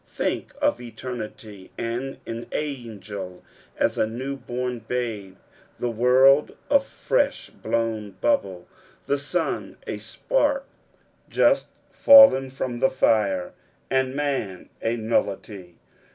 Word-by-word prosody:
Think - - -3
of 120 - +1
eternity, 110 -4 -8
and 120 +4 -3
an 115 +1 -6
angel 105 -10 -6 0.3
is - - -21
as - - +1
a - - +2
new 130 +5 -4
born 125 -2 -4
babe, 110 -5 -4 0.4
the 120 - -1
world 130 +5 +4
a 280 - +7
fresh - - -1
blown 110 -3 -2
bubble, 95 -6 0 0.4
the 140 0 0
sun 160 +4 -2
a - - -4
spark 290 - 0 0.6
just - - +3 0.2
fallen 275 - +8
from 130 -2 -4
the 135 - +3
fire, 100 -8 +1 0.4
and 130 0 +1
man 135 -11 -3
a 115 +1 0
nullity. 100 -4 -2
120 Hz, 115 wpm, -24 LUFS, 105-135 Hz, 0.6 s, fallen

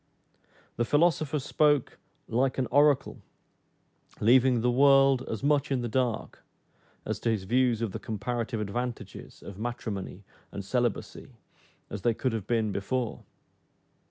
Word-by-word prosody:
The 120 - +1
philosopher 155 +2 +2
spoke 145 0 +1 0.3
'like 125 +3 0
an 130 - +1
oracle,' 145 0 +3 1.0
leaving 125 +1 +4
the 125 +1 +2
world 135 0 +5
as 110 +3 -4
much 145 0 +2
in 135 -3 0
the - - -1
dark 120 -1 -2 0.6
as - - -3
to 115 - -1
his 110 -4 0
views 120 +2 +1
of 110 - -2
the - - -5
comparative 115 +2 -3
advantages 120 +4 -5
of 100 0 -10
matrimony 105 -5 -5 0.3
and 100 - -6
celibacy, 120 +1 -2 0.6
as 100 - -5
they 115 +3 +1
could 130 0 -1
have 105 -3 -4
been 110 -3 0
before. 115 +5 -3
120 Hz, 135 wpm, -28 LUFS, 110-135 Hz, 1.0 s, world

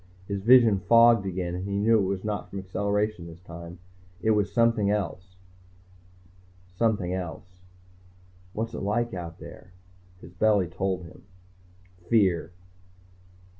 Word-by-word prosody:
His 100 -1 -3
vision 115 -2 +6
fogged 115 +2 +5
again, 90 -2 -3
and 90 +1 -4
he 100 0 -2
knew 110 +2 +3
it 95 - 0
was 95 -1 -3
not 105 -1 -4
from 100 - -7
acceleration 100 0 -2
this 85 0 -12
time, 85 0 -10 0.4
it 110 - +1
was 105 -2 +1
something 115 -3 +2
else. 95 -3 -3 1.4
Something 100 -4 0
else. 90 0 -7 0.9
What's 115 +1 -4
it - - -5
like 120 +4 -1
out 85 -2 -7
there? 90 0 -13 0.5
His 90 - -13
belly 100 0 +2
told 95 +1 -3
him. 85 - -14 0.9
Fear. 95 -7 +2
100 Hz, 130 wpm, -26 LUFS, 90-110 Hz, 1.4 s, vision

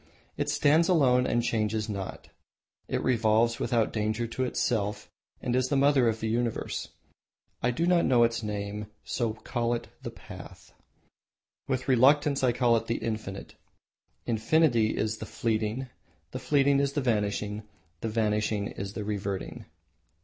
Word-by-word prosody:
It - - -2
stands 155 +4 +3
alone 130 -8 +4
and 120 0 +1
changes 110 -1 0
not. 100 -3 -6 0.6
It - - -2
revolves 115 -1 +2
without 115 -3 +1
danger 110 +2 -1
to 115 +3 -3
itself 110 -6 -1 0.3
and 120 - 0
is 130 0 +2
the 145 - +1
mother 135 -3 +4
of 110 0 -3
the 110 - -1
universe. 115 0 -2 0.7
I 125 - +2
do 125 +8 0
not 175 -1 +3
know 120 -2 +5
its 115 0 +1
name 105 -1 -4
and 105 0 -10
so 115 -3 -1
call 120 +2 -2
it 115 - -7
the - - -5
Path. - - -12 0.9
With 130 -1 -2
reluctance 140 +2 +4
I 125 - +4
call 120 -1 +3
it 115 0 -4
the 115 - 0
Infinite. 110 -4 -5 0.7
Infinity 115 0 +2
is 110 0 -1
the 110 - -6
Fleeting, 110 +3 -1 0.4
the - - -5
Fleeting 140 -1 +3
is 140 0 0
the 145 - 0
Vanishing, 105 -3 -1 0.4
the 115 - -3
Vanishing 105 -2 0
is 100 +1 -6
the 105 - -4
Reverting." 100 -2 -4
115 Hz, 155 wpm, -28 LUFS, 110-130 Hz, 0.9 s, know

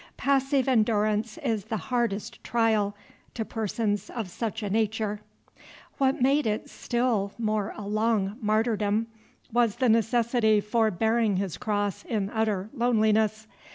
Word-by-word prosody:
Passive 275 -1 +2
endurance 215 -2 +1
is 225 -7 -1
the 220 - -2
hardest 235 -4 -2
trial 220 -3 +1 0.4
to 225 - -2
persons 215 -2 -2
of 220 -7 -5
such 220 +2 -4
a 205 - -2
nature. 215 -1 0 0.8
What 270 -1 +2
made 275 +2 +3
it 215 0 -2
still 235 -5 -1
more 215 -2 -1
a 210 - -6
long 215 -1 +1
martyrdom 215 0 +1 0.5
was 235 -3 +3
the 250 0 +2
necessity 225 -1 +3
for 220 +2 +1
bearing 220 +2 +1
his 190 -4 -2
cross 205 -2 -2
in 205 -3 -2
utter 215 -3 -1
loneliness. 220 -3 +2
220 Hz, 130 wpm, -27 LUFS, 210-235 Hz, 0.8 s, made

